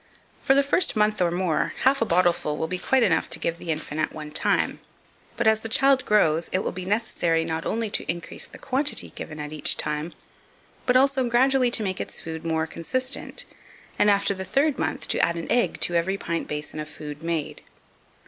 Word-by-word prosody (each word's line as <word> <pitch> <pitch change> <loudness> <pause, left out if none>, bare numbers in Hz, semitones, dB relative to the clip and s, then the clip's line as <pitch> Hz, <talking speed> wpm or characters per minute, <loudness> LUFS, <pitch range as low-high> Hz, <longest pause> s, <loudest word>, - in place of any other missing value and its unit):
For 270 - +3
the 280 - +5
first 300 +3 +2
month 215 -1 +2
or 175 - +3
more, 175 -3 0
half 270 0 +4
a 230 - +2
bottleful 170 -4 +2
will - - -1
be 180 +3 -3
quite 265 +4 +2
enough 185 -7 +2
to - - -1
give 170 +1 -2
the 170 - -8
infant 155 -1 -2
at - - 0
one 155 -1 -8
time; 150 - +1 0.6
but, 240 - 0
as 220 0 +4
the 225 - -5
child 270 +2 +4
grows, 165 -6 +3
it 185 - +1
will - - -2
be 180 0 -6
necessary 175 -6 0
not 160 0 -3
only 225 -1 -1
to - - -1
increase 170 0 -7
the - - -13
quantity 275 +2 -1
given 155 -1 -7
at 150 0 -5
each 155 - +1
time, 150 +3 -2 0.7
but 250 0 +5
also 265 -2 +3
gradually 255 +1 +3
to 225 - 0
make 190 -2 -2
its - - -6
food 160 -1 -6
more 160 -1 0
consistent, 255 - -3 0.5
and, 210 - +5
after 200 0 +3
the 190 -1 -5
third 275 +9 +1
month, - - -2
to - - +1
add 170 0 +2
an 165 - -5
egg 245 0 +1
to 175 - 0
every 175 +3 +1
pint 170 -3 -3
basin 150 +1 -4
of 155 0 -5
food 150 0 -8
made. 160 -2 -3
180 Hz, 210 wpm, -25 LUFS, 160-240 Hz, 0.7 s, the